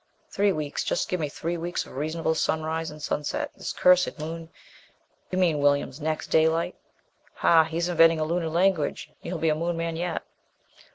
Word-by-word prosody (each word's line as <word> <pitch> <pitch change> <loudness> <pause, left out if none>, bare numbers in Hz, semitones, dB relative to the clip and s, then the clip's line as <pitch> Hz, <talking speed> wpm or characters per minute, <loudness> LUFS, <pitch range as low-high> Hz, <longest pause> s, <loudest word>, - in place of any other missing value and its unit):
"Three 200 0 +2
weeks. 150 -4 -3
Just - - -1
give 180 - -1
me 150 -2 -1
three 170 +4 -3
weeks 170 +1 -3
of - - -13
reasonable 160 +3 -1
sunrise 160 +1 -1
and 150 - -10
sunset! 150 - -2
This - - -5
cursed 180 0 +4
Moon! 165 +1 -6 0.8
You 185 - -3
mean, 170 -5 +2
Williams, 145 0 +1
next 155 +1 -3
daylight." 160 +1 +3 0.6
"Ha! 165 -1 +5
He's 165 +2 -2
inventing 165 -2 +5
a - - +1
Lunar 165 +1 -1
language. 170 -2 +1
You'll - - -4
be 160 - +1
a - - +3
Moon 170 +2 -2
man 165 0 -2
yet." 175 0 -2
165 Hz, 175 wpm, -26 LUFS, 155-175 Hz, 0.8 s, Ha